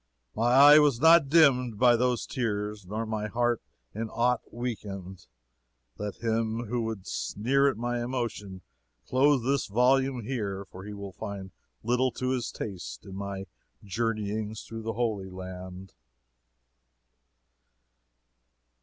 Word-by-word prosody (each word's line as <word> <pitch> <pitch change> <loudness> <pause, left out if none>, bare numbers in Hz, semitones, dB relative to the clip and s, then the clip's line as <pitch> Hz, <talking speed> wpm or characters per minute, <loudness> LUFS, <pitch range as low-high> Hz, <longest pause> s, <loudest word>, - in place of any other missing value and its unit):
"My 115 +3 +2
eye 145 +3 +9
was 145 -5 +3
not 160 -1 +6
dimmed 130 -8 +4
by 120 +1 +5
those 125 0 +1
tears 105 -4 -3
nor 110 +4 -3
my 110 -1 -3
heart 120 +1 0 0.3
in 110 +1 -4
aught 120 +1 +1
weakened. 100 -6 -6 0.7
Let 105 +2 -6
him 115 +1 0
who 120 +2 -2
would 110 -4 -4
sneer 135 +6 +1
at 130 - -4
my 120 +1 -2
emotion 115 -6 -4 0.4
close 135 - +3
this 135 +1 0
volume 125 +3 +2
here, 100 -5 -3
for 95 0 -11
he 105 - -7
will 100 -1 -8
find 95 0 -7 0.3
little 125 +2 +2
to 130 +1 -2
his 130 -2 -1
taste 95 -2 -7
in 95 - -9
my 100 -1 -5 0.4
journeyings 110 0 -2
through 115 0 -5
Holy 110 -4 -2
Land." 95 0 -9
115 Hz, 130 wpm, -28 LUFS, 100-125 Hz, 0.7 s, eye